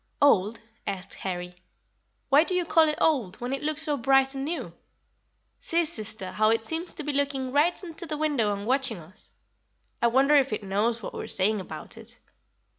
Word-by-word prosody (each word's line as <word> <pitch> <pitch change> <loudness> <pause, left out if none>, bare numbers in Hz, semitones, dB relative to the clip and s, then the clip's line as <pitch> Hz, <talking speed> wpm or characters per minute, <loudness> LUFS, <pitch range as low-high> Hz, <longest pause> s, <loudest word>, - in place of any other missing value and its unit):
"Old?" 225 -6 +4 0.3
asked 190 -2 -4
Harry; 180 -1 -5 0.7
"why 285 +2 +6
do 365 - -3
you 360 -1 +1
call 325 -1 +4
it 300 - -2
old, 240 - +1
when 245 +2 -3
it 275 - -2
looks 305 +1 -1
so 300 -2 0
bright 270 +1 +3
and 270 0 -4
new? 330 +4 -4 0.9
See, 335 0 +1
sister, 220 - -4
how 215 0 +3
it 225 0 +1
seems 330 +5 -1
to 310 - -5
be 295 0 -2
looking 275 -2 -1
right 310 +7 +2
into 340 -1 -5
the 305 -1 -3
window 290 -9 +1
and 200 0 -4
watching 260 -2 +1
us. 170 +3 -10 0.7
I 235 - +5
wonder 265 +5 +4
if 275 -5 +3
it 215 - -3
knows 215 +4 0
what - - -6
we - - -5
are - - -7
saying 200 +2 +2
about 160 -4 -8
it. - - -11
265 Hz, 195 wpm, -27 LUFS, 210-300 Hz, 0.9 s, why